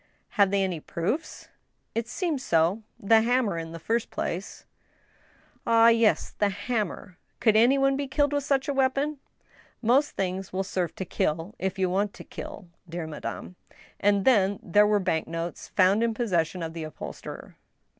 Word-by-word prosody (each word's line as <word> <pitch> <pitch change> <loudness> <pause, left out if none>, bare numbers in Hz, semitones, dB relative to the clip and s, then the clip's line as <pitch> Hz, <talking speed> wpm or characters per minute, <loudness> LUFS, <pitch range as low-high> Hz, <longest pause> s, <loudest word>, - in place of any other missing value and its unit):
" - - -42
Have 200 -2 +3
they 200 0 +1
any 180 -4 -2
proofs? 180 - -4
" - - -47
" - - -47
It 230 0 -2
seems 320 0 -2
so. 170 +1 +2 0.2
The 220 +2 +5
hammer 230 -6 +1
in 165 0 -6
the 165 - -7
first 225 +7 -1
place," 185 +4 -5 0.5
" - - -28
Ah, 230 0 +6
yes; 230 -2 +3
the 205 - +3
hammer. 205 -2 -3 0.2
Could 220 -3 +3
any 240 +5 +5
one 275 0 +3
be 280 0 -2
killed 290 +2 +1
with 285 -1 0
such 275 0 +1
a 285 - 0
weapon? 275 +2 0 0.2
" - - -33
" - - -30 0.2
Most 265 +6 +3
things 190 0 -3
will 190 +1 -1
serve 180 -3 -2
to 190 - -4
kill, 165 +4 -2
if 190 0 -2
you 190 -1 +2
want 195 +3 -1
to - - -10
kill, 190 - -9 0.2
dear 170 0 -4
madame. 160 +3 -7 0.4
And 200 -1 +2
then 205 -6 +4
there 205 +4 +4
were 210 0 +3
bank 175 -4 -1
notes 165 +1 -5
found 195 +3 +3
in 230 -1 +1
possession 180 -6 0
of 160 0 -5
the 165 - -6
uphol 155 -1 -6
sterer." - - -10
205 Hz, 195 wpm, -27 LUFS, 180-240 Hz, 0.5 s, Ah